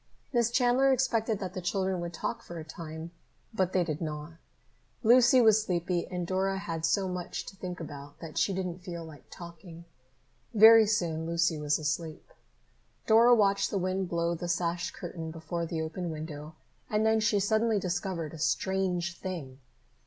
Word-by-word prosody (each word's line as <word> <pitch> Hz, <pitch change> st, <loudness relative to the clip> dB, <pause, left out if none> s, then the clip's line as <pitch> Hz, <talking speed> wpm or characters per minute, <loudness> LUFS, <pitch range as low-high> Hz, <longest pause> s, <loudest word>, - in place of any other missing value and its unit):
Miss 240 Hz, -2 st, +3 dB
Chandler 250 Hz, +2 st, +3 dB
expected 230 Hz, -4 st, +1 dB
that 185 Hz, -2 st, -5 dB
the 185 Hz, -, -4 dB
children 190 Hz, 0 st, -1 dB
would 170 Hz, 0 st, -4 dB
talk 175 Hz, -, -4 dB
for 175 Hz, -, -9 dB
a 160 Hz, -, -6 dB
time, 160 Hz, +1 st, -8 dB, 0.4 s
but 185 Hz, -4 st, 0 dB
they 185 Hz, -1 st, +2 dB
did 155 Hz, -2 st, -4 dB
not. 150 Hz, 0 st, -5 dB, 0.7 s
Lucy 245 Hz, +2 st, +6 dB
was 220 Hz, -2 st, +5 dB
sleepy 175 Hz, -2 st, -1 dB
and 180 Hz, -1 st, -4 dB
Dora 190 Hz, +2 st, 0 dB
had 165 Hz, -4 st, -3 dB
so 195 Hz, +1 st, +1 dB
much 180 Hz, -1 st, -4 dB
to -, -, -10 dB
think 185 Hz, -2 st, -6 dB
about 145 Hz, -3 st, -9 dB
that 165 Hz, -2 st, -9 dB
she -, -, +2 dB
didn't 180 Hz, -2 st, -3 dB
feel 170 Hz, -2 st, -7 dB
like 155 Hz, -4 st, -13 dB
talking. 170 Hz, -1 st, -11 dB, 0.7 s
Very 220 Hz, +1 st, +9 dB
soon 165 Hz, -6 st, 0 dB
Lucy 170 Hz, -1 st, +1 dB
was 150 Hz, 0 st, +1 dB
asleep. 155 Hz, +1 st, -4 dB, 0.7 s
Dora 230 Hz, +2 st, +6 dB
watched 200 Hz, -3 st, +2 dB
the 200 Hz, -, -1 dB
wind 185 Hz, 0 st, -1 dB
blow 170 Hz, 0 st, 0 dB
the 175 Hz, +1 st, -5 dB
sash 175 Hz, 0 st, -1 dB
curtain 165 Hz, -2 st, -7 dB
before 165 Hz, +1 st, -4 dB
the 160 Hz, -1 st, -2 dB
open 170 Hz, +2 st, -4 dB
window 155 Hz, -1 st, -7 dB, 0.3 s
and 215 Hz, +1 st, +1 dB
then 220 Hz, 0 st, +4 dB
she 215 Hz, -1 st, +2 dB
suddenly 220 Hz, +2 st, +2 dB
discovered 175 Hz, -3 st, -3 dB
a 160 Hz, -, -9 dB
strange 180 Hz, +1 st, 0 dB
thing. 150 Hz, -9 st, -6 dB
175 Hz, 170 wpm, -29 LUFS, 165-200 Hz, 0.7 s, Very